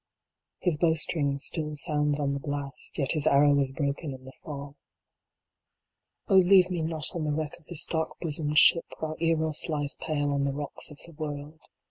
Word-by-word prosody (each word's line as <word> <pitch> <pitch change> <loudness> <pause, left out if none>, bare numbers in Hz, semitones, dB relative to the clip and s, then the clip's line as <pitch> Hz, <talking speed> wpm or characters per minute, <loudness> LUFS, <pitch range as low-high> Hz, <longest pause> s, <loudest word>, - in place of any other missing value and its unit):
His 170 -5 0
bowstring 155 -3 +1
still 150 +1 -1
sounds 150 -1 0
on 140 -1 0
the 140 - -2
blast, 140 0 -5
yet 135 -4 0
his 155 -1 0
arrow 145 0 +5
was 140 -2 +1
broken 140 0 -3
in 130 0 -15
the 130 - -9
fall. 140 -1 -7 1.5
Oh 190 - +5
leave 185 0 +6
me 175 -2 -1
not 160 -1 -1
on 165 - -2
the 150 - 0
wreck 155 +1 -2
of 165 - -26
this 170 -4 0
dark 160 -1 -2
bosomed 150 -2 -1
ship 165 +1 +6
while 155 0 -4
Eros 160 -1 +1
lies 145 -2 -2
pale 145 -2 -1
on 140 0 0
the 140 0 0
rocks 145 0 -4
of 150 - -12
the 170 - -13
world. 150 0 -6
150 Hz, 185 wpm, -28 LUFS, 145-160 Hz, 1.5 s, leave